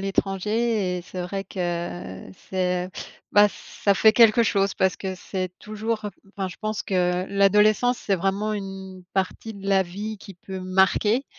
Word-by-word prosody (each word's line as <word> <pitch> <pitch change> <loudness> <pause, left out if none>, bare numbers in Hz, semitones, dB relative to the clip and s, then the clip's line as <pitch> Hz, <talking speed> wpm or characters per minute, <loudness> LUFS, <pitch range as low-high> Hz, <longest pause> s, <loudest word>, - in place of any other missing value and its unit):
l'étranger 195 0 0
et - - -7
c'est 180 +1 -7
vrai 195 +2 -4
que 175 - -4 0.2
c'est 180 -1 0
heu, 185 - -12 0.4
bah 205 0 +7
ça 200 - -1
fait 220 +2 +6
quelque 230 0 +6
chose 200 -2 +2
parce 185 -3 +1
que 190 -1 -4
c'est 185 0 -4
toujours 215 0 -3
heu - - -4 0.3
enfin 190 -1 -2
je 180 - -10
pense 215 0 -2
que 180 -1 0
l'adolescence 210 +5 +4
c'est 200 - 0
vraiment 195 +4 0
une 195 -2 -7
partie 195 +3 -2
de 195 -1 -7
la 195 -1 +4
vie 205 +5 -6
qui 195 -3 -11
peut 190 +1 -8
marquer 190 +6 +2
195 Hz, 170 wpm, -24 LUFS, 185-210 Hz, 0.4 s, bah